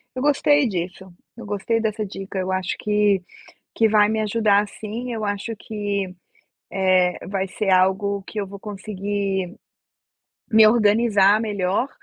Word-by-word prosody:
Eu 255 Hz, -, -3 dB
gostei 290 Hz, 0 st, +3 dB
disso, 185 Hz, -1 st, -5 dB, 0.2 s
eu 235 Hz, -, -10 dB
gostei 205 Hz, +3 st, -1 dB
dessa 215 Hz, -1 st, -2 dB
dica. 195 Hz, 0 st, -7 dB
Eu 185 Hz, 0 st, -2 dB
acho 185 Hz, 0 st, -2 dB
que 210 Hz, -3 st, +1 dB, 0.5 s
que 225 Hz, -, +3 dB
vai 210 Hz, -1 st, +4 dB
me 220 Hz, 0 st, 0 dB
ajudar 210 Hz, -1 st, +2 dB
sim, 230 Hz, +5 st, -6 dB
eu 225 Hz, -, -4 dB
acho 205 Hz, +2 st, -3 dB
que, 205 Hz, -2 st, -3 dB, 0.6 s
eh, 185 Hz, -2 st, +2 dB
vai 195 Hz, 0 st, -2 dB
ser 195 Hz, +1 st, -3 dB
algo 190 Hz, +2 st, +2 dB
que 215 Hz, -, -5 dB
eu 200 Hz, -, -2 dB
vou 200 Hz, +1 st, -10 dB
conseguir 200 Hz, -2 st, -3 dB, 1.0 s
me 220 Hz, 0 st, +7 dB
organizar 215 Hz, -2 st, +4 dB
melhor 205 Hz, +3 st, -1 dB
205 Hz, 145 wpm, -22 LUFS, 190-220 Hz, 1.0 s, me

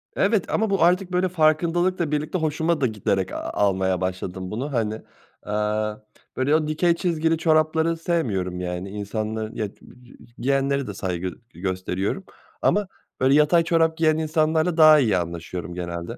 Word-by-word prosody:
Evet 200 Hz, -2 st, +2 dB
ama 220 Hz, -1 st, +1 dB
bu 195 Hz, -3 st, +2 dB
artık 180 Hz, +1 st, +2 dB
böyle 180 Hz, +1 st, +1 dB
farkındalıkla 170 Hz, +1 st, +1 dB
birlikte 150 Hz, +4 st, -1 dB
hoşuma 160 Hz, 0 st, 0 dB
da 130 Hz, -, +3 dB
giderek 100 Hz, -3 st, -1 dB
a -, -, -4 dB, 0.2 s
almaya 95 Hz, -2 st, +1 dB
başladım 95 Hz, 0 st, -4 dB
bunu, 135 Hz, +6 st, -4 dB
hani. 110 Hz, -2 st, -1 dB, 0.4 s
Aaa, 105 Hz, 0 st, -1 dB, 0.4 s
böyle, 140 Hz, +4 st, +2 dB
o 155 Hz, -1 st, +1 dB
dikey 170 Hz, +3 st, +2 dB
çizgili 165 Hz, -2 st, 0 dB
çorapları 160 Hz, 0 st, +2 dB
sevmiyorum 105 Hz, -, -1 dB
yani. 90 Hz, +1 st, -4 dB
İnsanların, 110 Hz, +2 st, -4 dB
ya, 105 Hz, -, -2 dB, 0.7 s
giyenlere 135 Hz, +1 st, 0 dB
de 100 Hz, -, -5 dB
saygı 95 Hz, -1 st, -3 dB, 0.3 s
g 85 Hz, -, -14 dB
gösteriyorum 95 Hz, -, -2 dB, 0.4 s
ama 205 Hz, -1 st, +2 dB, 0.3 s
böyle 130 Hz, +1 st, +3 dB
yatay 150 Hz, +3 st, +4 dB
çorap 165 Hz, -1 st, +2 dB
giyen 155 Hz, -1 st, +3 dB
insanlarla 160 Hz, +1 st, +1 dB
daha 155 Hz, -1 st, +8 dB
iyi 110 Hz, -8 st, +2 dB
anlaşıyorum 85 Hz, +1 st, -5 dB
genelde. 85 Hz, -1 st, -5 dB
140 Hz, 150 wpm, -23 LUFS, 100-165 Hz, 0.7 s, daha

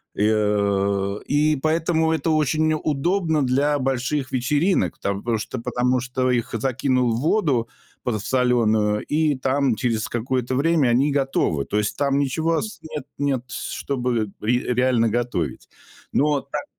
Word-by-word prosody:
и, -, -, -3 dB
э, 100 Hz, -1 st, +1 dB
и 150 Hz, +1 st, +2 dB
поэтому 160 Hz, +2 st, +1 dB
это 160 Hz, 0 st, 0 dB
очень 155 Hz, +1 st, +2 dB
удобно 155 Hz, +2 st, 0 dB
для 145 Hz, +3 st, +1 dB
больших 130 Hz, +1 st, -1 dB
вечеринок, 150 Hz, +9 st, +1 dB
там 100 Hz, 0 st, -2 dB
потому 115 Hz, -1 st, 0 dB
что 120 Hz, +3 st, -5 dB
потому 125 Hz, +2 st, 0 dB
что 130 Hz, 0 st, -1 dB
их 120 Hz, -2 st, -1 dB
закинул 125 Hz, 0 st, +1 dB
в -, -, -2 dB
воду 150 Hz, -, +1 dB, 0.4 s
подсолённую, 110 Hz, -2 st, +1 dB
и 150 Hz, -1 st, +1 dB
там 130 Hz, -2 st, +1 dB
через 110 Hz, -1 st, -1 dB
какое-то 125 Hz, +1 st, -1 dB
время 150 Hz, -2 st, +2 dB
они 130 Hz, +5 st, +3 dB
готовы. 135 Hz, -, 0 dB
То 105 Hz, -, -2 dB
есть 105 Hz, 0 st, -1 dB
там 140 Hz, -1 st, +1 dB
ничего 160 Hz, +4 st, 0 dB
ос 215 Hz, +6 st, -4 dB
нет, 150 Hz, -4 st, -6 dB
нет 140 Hz, -4 st, 0 dB
с -, -, -6 dB
чтобы 125 Hz, -6 st, -2 dB
ре 120 Hz, +3 st, +2 dB
реально 125 Hz, -2 st, +2 dB
готовить. 110 Hz, -, -2 dB, 0.4 s
Но 145 Hz, -1 st, +2 dB
так 140 Hz, -, -5 dB
130 Hz, 145 wpm, -22 LUFS, 115-150 Hz, 0.4 s, они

